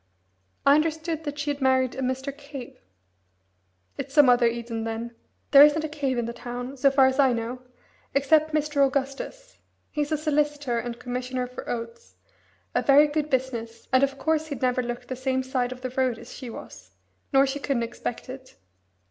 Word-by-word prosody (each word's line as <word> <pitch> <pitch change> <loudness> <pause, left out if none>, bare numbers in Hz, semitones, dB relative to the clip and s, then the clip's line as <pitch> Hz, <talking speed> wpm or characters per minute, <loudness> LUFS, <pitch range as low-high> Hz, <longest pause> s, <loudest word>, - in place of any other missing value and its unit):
"I 280 - +7
understood 320 +1 0
that 290 0 -4
she 290 0 -1
had 285 0 -6
married 260 -1 +3
a 265 - -5
Mr. 265 +2 -2
Cave." 280 -3 -10 1.2
"It's 275 0 -6
some 290 -4 +7
other 245 -1 +5
Eden, 230 -1 -3
then. 225 +1 -4 0.4
There 280 0 +10
isn't 300 +1 +4
a - - -1
Cave 285 -4 -2
in 240 - 0
the 235 - -4
town, 245 +2 -6
so 275 +1 +4
far 270 -1 +5
as 265 +1 +1
I 265 -3 +5
know, 235 +2 -4 0.5
except 310 +3 +3
Mr. 300 -2 +1
Augustus; 275 - -3 0.3
he's 295 0 -2
a 310 - +2
solicitor 295 -4 0
and 235 0 -5
Commissioner 250 +1 -3
for 250 +1 -9
Oaths, 230 0 -6 0.6
a - - +2
very 285 +2 +6
good 300 0 -2
business, 235 -4 -3
and 260 - +6
of 275 0 +1
course 315 +2 0
he'd 285 -5 -6
never 255 0 +2
look 240 0 -5
the 260 - -5
same 260 0 -1
side 255 -1 -1
of 255 0 -8
the 255 -1 -4
road 255 -2 0
as - - -11
she 255 -3 -8
was, - - -11 0.4
nor 270 -1 +5
she 275 +1 -3
couldn't 275 -4 -1
expect 235 0 -5
it." 260 0 -10
265 Hz, 190 wpm, -26 LUFS, 245-290 Hz, 1.2 s, There